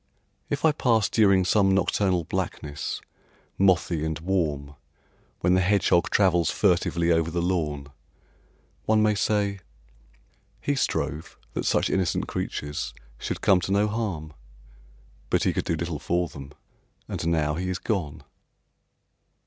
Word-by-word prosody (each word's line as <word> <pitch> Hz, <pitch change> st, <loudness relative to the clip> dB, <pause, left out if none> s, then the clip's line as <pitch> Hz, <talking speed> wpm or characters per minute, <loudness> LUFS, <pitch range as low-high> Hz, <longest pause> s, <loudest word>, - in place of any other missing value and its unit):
If 145 Hz, +2 st, -1 dB
I 160 Hz, -, +6 dB
pass 115 Hz, -7 st, +2 dB
during 100 Hz, -4 st, +4 dB
some 95 Hz, 0 st, +3 dB
nocturnal 95 Hz, -1 st, +1 dB
blackness, 75 Hz, -1 st, -4 dB, 0.6 s
mothy 90 Hz, -4 st, +2 dB
and 80 Hz, -1 st, -2 dB
warm, 80 Hz, -5 st, -1 dB, 0.7 s
When 90 Hz, +1 st, +3 dB
the 95 Hz, -, +4 dB
hedgehog 90 Hz, -2 st, +3 dB
travels 90 Hz, -5 st, +3 dB
furtively 85 Hz, -3 st, +2 dB
over 80 Hz, -1 st, +2 dB
the 85 Hz, +1 st, -2 dB
lawn, 75 Hz, -5 st, -1 dB, 1.0 s
One 110 Hz, 0 st, +4 dB
may 105 Hz, 0 st, +3 dB
say, 100 Hz, -1 st, 0 dB, 1.0 s
"He 145 Hz, -, -1 dB
strove 80 Hz, -, -2 dB, 0.2 s
that -, -, -3 dB
such -, -, +2 dB
innocent 95 Hz, -4 st, 0 dB
creatures 75 Hz, 0 st, -4 dB, 0.2 s
should -, -, -4 dB
come 95 Hz, -2 st, +4 dB
to 95 Hz, -, -3 dB
no 100 Hz, +2 st, +3 dB
harm, 100 Hz, -9 st, -3 dB, 1.0 s
But -, -, +2 dB
he -, -, +2 dB
could -, -, -2 dB
do 85 Hz, -, 0 dB
little 85 Hz, -2 st, -3 dB
for 85 Hz, +2 st, 0 dB
them; 70 Hz, -2 st, -10 dB, 0.5 s
and -, -, -4 dB
now 80 Hz, -3 st, +1 dB
he 90 Hz, +4 st, -3 dB
is 90 Hz, -, -1 dB
gone"? 90 Hz, -12 st, -3 dB
90 Hz, 135 wpm, -26 LUFS, 80-100 Hz, 1.0 s, I